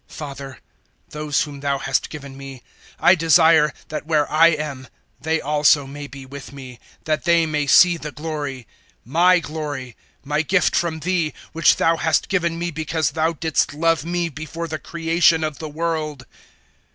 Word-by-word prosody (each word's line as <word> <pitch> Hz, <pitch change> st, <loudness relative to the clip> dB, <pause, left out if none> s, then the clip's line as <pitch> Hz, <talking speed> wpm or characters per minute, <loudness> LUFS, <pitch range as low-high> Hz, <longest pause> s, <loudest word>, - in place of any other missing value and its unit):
017:024 -, -, -13 dB
"Father, 140 Hz, -2 st, -8 dB, 0.5 s
those 150 Hz, -1 st, -1 dB
whom 145 Hz, -2 st, -8 dB
Thou 140 Hz, 0 st, -1 dB
hast 135 Hz, -1 st, -1 dB
given 140 Hz, -3 st, -9 dB
me 135 Hz, -2 st, -10 dB, 0.4 s
I 175 Hz, -, +6 dB
desire 160 Hz, -2 st, +4 dB, 0.2 s
that 155 Hz, 0 st, -5 dB
where 150 Hz, -2 st, +2 dB
I 160 Hz, +2 st, +6 dB
am 150 Hz, -5 st, -2 dB, 0.3 s
they 160 Hz, +1 st, 0 dB
also 150 Hz, -1 st, +3 dB
may 145 Hz, +1 st, -8 dB
be 140 Hz, -1 st, -11 dB
with 140 Hz, +1 st, -10 dB
me, 130 Hz, -3 st, -11 dB, 0.2 s
that 155 Hz, -1 st, -2 dB
they 170 Hz, -1 st, +4 dB
may 150 Hz, -2 st, -1 dB
see 175 Hz, +5 st, +6 dB
the 150 Hz, -2 st, -7 dB
glory 145 Hz, -5 st, -5 dB, 0.4 s
my 175 Hz, +8 st, +4 dB
glory 150 Hz, -7 st, -5 dB, 0.3 s
my 150 Hz, +1 st, 0 dB
gift 180 Hz, +4 st, +1 dB
from 160 Hz, -2 st, -1 dB
Thee, 170 Hz, -2 st, -1 dB, 0.2 s
which 165 Hz, -, +4 dB
Thou 165 Hz, 0 st, +2 dB
hast 160 Hz, -1 st, 0 dB
given 170 Hz, -3 st, 0 dB
me 175 Hz, +1 st, -3 dB
because 155 Hz, -1 st, -1 dB
Thou 160 Hz, +1 st, 0 dB
didst 160 Hz, -2 st, -1 dB
love 165 Hz, 0 st, +1 dB
me 175 Hz, +1 st, -1 dB
before 160 Hz, +2 st, -6 dB
the 155 Hz, -1 st, -5 dB
creation 165 Hz, -1 st, +2 dB
of 155 Hz, -2 st, -3 dB
the 155 Hz, -, -6 dB
world. 155 Hz, -3 st, -3 dB
155 Hz, 170 wpm, -21 LUFS, 145-165 Hz, 0.5 s, I